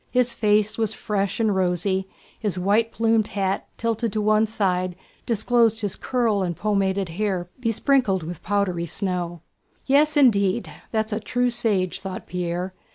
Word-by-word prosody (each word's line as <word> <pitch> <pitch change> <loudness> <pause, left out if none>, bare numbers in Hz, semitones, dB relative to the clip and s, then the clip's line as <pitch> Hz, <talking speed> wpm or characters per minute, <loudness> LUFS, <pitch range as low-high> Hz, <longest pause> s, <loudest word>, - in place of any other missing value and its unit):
His 250 -1 +2
face 210 0 +2
was 220 -1 +1
fresh 200 -1 -2
and 215 -3 +2
rosy, 190 +1 0 0.3
his 205 -4 -2
white 210 +5 +2
plumed 225 -1 +2
hat, 195 -1 -2
tilted 230 -1 -1
to 215 - 0
one 215 +1 +3
side, 185 -4 0 0.3
disclosed 230 0 +2
his 205 -3 -2
curled 230 -6 0
and 175 -2 -2
pomaded 195 -2 0
hair 180 -1 -2
besprinkled 230 - +1
with 170 +1 -7
powdery 185 -4 -1
snow. 175 -2 -3 0.4
"Yes, 295 +2 +3
indeed, 215 -6 +3 0.2
that's 220 -1 -1
a 215 - -1
true 245 +3 0
sage," 200 -6 0
thought 190 -1 -6
Pierre. 180 +1 -3
205 Hz, 150 wpm, -23 LUFS, 185-225 Hz, 0.4 s, one